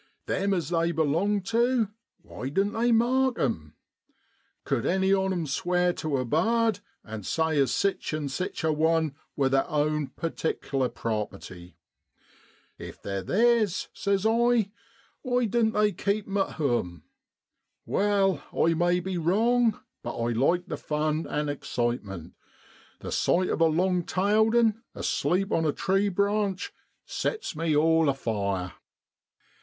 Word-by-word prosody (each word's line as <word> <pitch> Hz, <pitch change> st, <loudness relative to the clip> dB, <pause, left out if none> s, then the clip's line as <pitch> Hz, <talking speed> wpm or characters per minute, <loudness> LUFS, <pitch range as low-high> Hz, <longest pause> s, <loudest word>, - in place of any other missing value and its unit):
Them 200 Hz, 0 st, 0 dB
as 170 Hz, -5 st, -2 dB
they 170 Hz, -1 st, +1 dB
belong 170 Hz, +6 st, +1 dB
tu, 230 Hz, +2 st, +1 dB, 0.3 s
why 130 Hz, -, -6 dB
doan't 195 Hz, +8 st, 0 dB
they 235 Hz, +2 st, +1 dB
mark 250 Hz, +2 st, +3 dB
'em? 80 Hz, -, -2 dB, 0.9 s
Cud 130 Hz, -4 st, -1 dB
any 190 Hz, +1 st, +2 dB
on 190 Hz, 0 st, +1 dB
'em 175 Hz, -3 st, -1 dB
sware 180 Hz, +5 st, +1 dB
tu 155 Hz, -5 st, -2 dB
a 130 Hz, -, -1 dB
bard, 220 Hz, -, +2 dB, 0.2 s
and 110 Hz, -2 st, -7 dB
say 160 Hz, -, 0 dB
as 135 Hz, -4 st, +2 dB
sich 200 Hz, +8 st, 0 dB
an' 155 Hz, -2 st, -2 dB
sich 160 Hz, +7 st, -4 dB
a 160 Hz, -1 st, +2 dB
one 160 Hz, -1 st, +1 dB, 0.2 s
wor 140 Hz, -2 st, +2 dB
theer 135 Hz, 0 st, +3 dB
own 150 Hz, -2 st, 0 dB
pertikler 140 Hz, -5 st, -2 dB
property? 95 Hz, -6 st, -5 dB, 1.0 s
If -, -, -9 dB
they're 100 Hz, -1 st, -3 dB
theers, 220 Hz, -, +2 dB
says 200 Hz, 0 st, 0 dB
I, 230 Hz, -2 st, +3 dB, 0.5 s
why 250 Hz, -1 st, +1 dB
doan't 225 Hz, 0 st, +1 dB
they 210 Hz, 0 st, +3 dB
keep 205 Hz, +1 st, -1 dB
'em 200 Hz, 0 st, -3 dB
at 195 Hz, -, 0 dB
home? 120 Hz, -, -1 dB, 0.8 s
Wai, 195 Hz, -4 st, +1 dB
I 165 Hz, -, +2 dB
may 175 Hz, +2 st, +2 dB
be 185 Hz, -1 st, -3 dB
wrong, 225 Hz, +6 st, +2 dB, 0.2 s
but 120 Hz, -, -5 dB
I 115 Hz, 0 st, 0 dB
like 165 Hz, +10 st, +1 dB
the 150 Hz, -, -5 dB
fun 155 Hz, +2 st, -1 dB
an' 150 Hz, 0 st, -2 dB
excitement: 120 Hz, -, -3 dB, 0.7 s
the -, -, -6 dB
sight 185 Hz, +1 st, +2 dB
of -, -, -1 dB
a -, -, +7 dB
long 180 Hz, +3 st, +1 dB
tailed 215 Hz, +4 st, +2 dB
'un 225 Hz, -2 st, +3 dB
asleep 195 Hz, +2 st, 0 dB
on 165 Hz, -, +2 dB
a 155 Hz, -, +2 dB
tree 195 Hz, +6 st, +1 dB
branch 200 Hz, 0 st, 0 dB, 0.3 s
sets 445 Hz, -, -3 dB
me 160 Hz, -1 st, 0 dB
all 160 Hz, 0 st, +4 dB
afire. 100 Hz, -8 st, -2 dB
175 Hz, 145 wpm, -27 LUFS, 140-205 Hz, 1.0 s, a